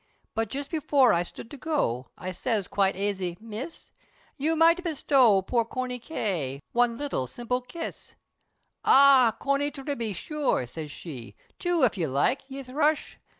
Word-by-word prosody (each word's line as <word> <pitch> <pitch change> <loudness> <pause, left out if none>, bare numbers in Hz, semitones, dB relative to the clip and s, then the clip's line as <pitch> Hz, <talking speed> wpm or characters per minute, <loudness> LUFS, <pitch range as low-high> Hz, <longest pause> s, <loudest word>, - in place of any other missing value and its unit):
But 225 -1 -1
just 280 +3 -5
before 280 -7 +3
I 170 - +2
stood 180 +5 -8
to 285 - -8
go, 190 - -1
I 185 - -5
siz 210 0 -1
quite 195 -1 +1
aisy 190 -3 -2
"Miss, 230 +8 -7 0.4
You 310 +3 +1
might 335 +2 +4
bestow 265 - +3
poor 235 +4 +1
Corney 250 +2 -4
K. 180 - -2
One 240 -1 +2
little 275 - -2
simple 245 - -2
kiss." 330 +7 -8 0.7
"Ah! 265 -4 +7
Corney 280 +1 +1
tibbey, 270 -7 -4
sure," 290 - -1
said 150 +5 -7
she, 140 -6 -9 0.2
"Two 350 -4 +1
if 225 -6 +2
ye 165 - +1
like, 140 - +1
ye 275 0 -6
thrush!" 295 +4 0
245 Hz, 150 wpm, -27 LUFS, 195-285 Hz, 0.7 s, Ah